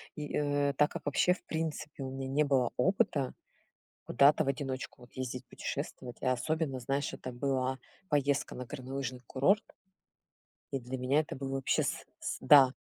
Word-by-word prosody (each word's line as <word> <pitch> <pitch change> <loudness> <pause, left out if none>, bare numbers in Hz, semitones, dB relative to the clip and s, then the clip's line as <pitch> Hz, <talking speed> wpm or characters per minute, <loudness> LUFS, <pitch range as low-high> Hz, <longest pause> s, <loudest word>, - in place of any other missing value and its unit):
И, 150 -2 -5
э, 145 -1 +2
так 150 +2 +3
как - - -6
вообще, 145 +5 +3
в 180 - -11
принципе, 155 -3 -3
у 130 - -4
меня 135 0 -4
не 145 +3 +2
было 135 -4 +2
опыта 185 - +2 0.7
куда-то 145 +2 +5
в - - -6
одиночку 135 -3 -4
вот 120 - -17
ездить 130 -1 -4
путешествовать, 125 -2 -5
а 130 -1 +3
особенно, 150 +1 -1
знаешь, 135 +3 -1
это 130 - -6
была 130 0 0 0.3
поездка 145 -1 +1
на 125 - -5
горнолыжный 130 -1 -5
курорт, 195 +11 +3 1.1
и 135 - -1
для 125 +2 -5
меня 130 +4 +3
это 155 - -4
было 135 0 -4
вообще 135 - +1
с - - -2 0.2
с - - -3
да. 135 -3 +8
135 Hz, 170 wpm, -32 LUFS, 130-145 Hz, 1.1 s, да